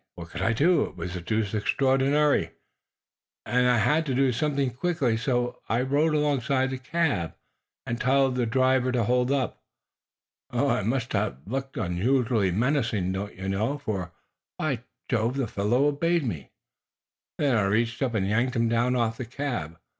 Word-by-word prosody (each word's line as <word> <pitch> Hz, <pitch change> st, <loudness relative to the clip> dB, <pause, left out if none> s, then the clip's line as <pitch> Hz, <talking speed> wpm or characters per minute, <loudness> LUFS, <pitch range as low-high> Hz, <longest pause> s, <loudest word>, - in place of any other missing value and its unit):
What 85 Hz, -1 st, -9 dB
could 90 Hz, -, -5 dB
I 110 Hz, -, +2 dB
do? 165 Hz, +9 st, +3 dB
It -, -, -10 dB
was 90 Hz, 0 st, -5 dB
deuced 110 Hz, +3 st, -1 dB
extraordinary, 135 Hz, +6 st, +2 dB, 1.0 s
and 125 Hz, 0 st, +2 dB
I 125 Hz, -, +4 dB
had 150 Hz, +9 st, +3 dB
to 130 Hz, -, 0 dB
do 135 Hz, 0 st, +3 dB
something 140 Hz, +1 st, 0 dB
quickly, 135 Hz, -3 st, 0 dB
so 120 Hz, +1 st, -1 dB
I 115 Hz, +3 st, +1 dB
rode 150 Hz, +4 st, +2 dB
alongside 135 Hz, -3 st, +1 dB
the 130 Hz, -, -4 dB
cab 130 Hz, -, -1 dB, 0.5 s
and 115 Hz, 0 st, -3 dB
told 135 Hz, 0 st, +3 dB
the 125 Hz, -2 st, 0 dB
driver 130 Hz, +1 st, +2 dB
to 120 Hz, -2 st, +2 dB
hold 125 Hz, +3 st, +1 dB
up. 135 Hz, -4 st, -1 dB, 0.9 s
I -, -, +1 dB
must 120 Hz, +3 st, -1 dB
have 100 Hz, -8 st, 0 dB
looked 135 Hz, +5 st, -4 dB
unusually 110 Hz, +3 st, +1 dB
menacing, 110 Hz, -3 st, 0 dB
don't 100 Hz, +2 st, -4 dB
you 95 Hz, +1 st, -6 dB
know, 110 Hz, +9 st, 0 dB
for, 100 Hz, -, -4 dB, 0.5 s
by 140 Hz, -6 st, -1 dB, 0.3 s
Jove, 115 Hz, +1 st, 0 dB
the 135 Hz, -, +1 dB
fellow 110 Hz, +6 st, +1 dB
obeyed 165 Hz, +3 st, +1 dB
me. 80 Hz, -, -4 dB, 0.9 s
Then 140 Hz, -4 st, +2 dB
I 105 Hz, -3 st, +2 dB
reached 115 Hz, +5 st, 0 dB
up 125 Hz, -4 st, 0 dB
and 95 Hz, -3 st, +1 dB
yanked 120 Hz, +5 st, +1 dB
him 115 Hz, -1 st, +2 dB
down 120 Hz, +2 st, +1 dB
off 115 Hz, -2 st, 0 dB
the 130 Hz, -, -4 dB
cab. 120 Hz, -, -4 dB
125 Hz, 165 wpm, -26 LUFS, 110-135 Hz, 1.0 s, I